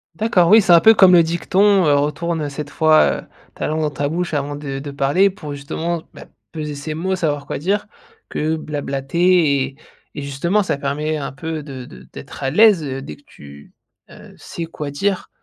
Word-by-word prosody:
D'accord, 190 -4 +2
oui, 220 +1 +7
c'est 180 - +1
un 170 - +8
peu 220 +7 +7
comme 190 -4 +6
le 170 -2 +7
dicton: 185 +3 +2
«Heu, 145 - +4
retourne, 150 +3 -1
heu, 145 - -3
7 145 +1 -7
fois, 155 0 +3
heu, - - -22 0.3
ta - - -4
langue 155 +1 -1
dans 155 - 0
ta 145 0 -3
bouche 170 -1 -2
avant 145 0 -2
de 140 -2 -6
de 140 +1 -6
parler.» 140 +8 +2
pour 150 -6 -8
justement, 160 +4 -4
ben, - - -13 0.2
peser 150 -2 -5
ses 145 +2 -5
mots, 185 +5 -2
savoir 145 -5 -2
quoi - - -3
dire, 195 +9 -1 0.4
que 155 +1 -1
blablater 150 +1 +1
et 135 0 -10 0.4
et 145 - -5
justement, 155 +9 0
ça 180 - -2
permet 150 +3 -2
un 145 - -5
peu 155 +3 -6
de 130 -3 -8
de 65 -1 -14
d'être - - -10
à 135 - 0
l'aise, 205 -1 +5
heu, 135 -2 -5
dès - - -8
que 145 - -25
tu, 70 0 -15 0.4
heu, - - -15
sais 170 - -7
quoi 150 -3 -7
dire. 195 +7 -2
155 Hz, 210 wpm, -19 LUFS, 140-175 Hz, 0.4 s, un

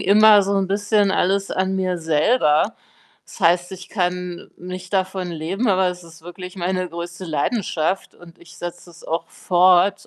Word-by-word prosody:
immer 210 +1 +6
so 200 +1 -1
'n 195 -1 0
bisschen 205 0 +2
alles 195 +1 +1
an 190 0 -1
mir 185 -1 -1
selber. 160 +4 +2 0.5
Das - - -14
heißt, 175 +2 +2
ich 185 -1 -9
kann 180 -2 -3
nicht 185 +1 -8
davon 190 -1 -1
leben, 175 +8 -2
aber 190 -1 +3
es 180 -1 -7
ist 165 -1 -16
wirklich 180 +2 -9
meine 185 0 -2
größte 170 +2 -7
Leidenschaft 175 +2 -1
und 175 -1 -16
ich 170 -1 -16
setze 175 0 -7
es 170 - -17
auch 165 +1 -3
fort, 185 +1 +3
180 Hz, 165 wpm, -21 LUFS, 175-195 Hz, 0.5 s, immer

